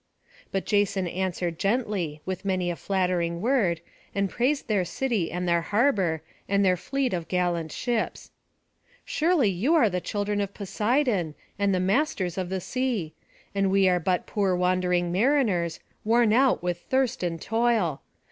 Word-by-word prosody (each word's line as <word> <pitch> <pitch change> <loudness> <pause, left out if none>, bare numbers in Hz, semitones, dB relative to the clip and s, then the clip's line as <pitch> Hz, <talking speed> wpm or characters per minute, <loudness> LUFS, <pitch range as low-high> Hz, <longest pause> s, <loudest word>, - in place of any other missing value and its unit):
But 195 - -2
Jason 200 -3 +1
answered 175 -2 -2
gently, 195 -8 -1
with 185 +1 -4
many 185 -3 0
a - - -4
flattering 180 -3 -1
word, 205 -7 +1 0.3
and 200 -1 0
praised 275 +4 0
their 205 -4 +2
city 215 -1 -1
and 180 +1 -3
their 170 -1 +3
harbour, 195 - +1 0.3
and 200 0 +3
their 185 -1 +4
fleet 270 +6 -2
of 170 -2 -3
gallant 175 -3 -1
ships. 235 +3 -2 0.7
"Surely 320 - +2
you 230 - +1
are 235 -11 +4
the 180 0 -1
children 205 +1 -1
of 200 0 -4
Poseidon, 210 - 0 0.2
and 200 -1 +2
the 185 - +1
masters 190 - 0
of 180 -1 -3
the 190 0 -2
sea; 235 -10 -2 0.4
and 195 -1 +1
we 195 0 +4
are 180 -1 +3
but 180 +1 0
poor 195 -3 0
wandering 180 -1 +1
mariners, 200 - +1 0.2
worn 230 0 +3
out 260 -4 +3
with 175 -1 -1
thirst 260 +4 0
and 170 -2 -2
toil. 225 -10 +1
190 Hz, 155 wpm, -26 LUFS, 175-230 Hz, 0.7 s, their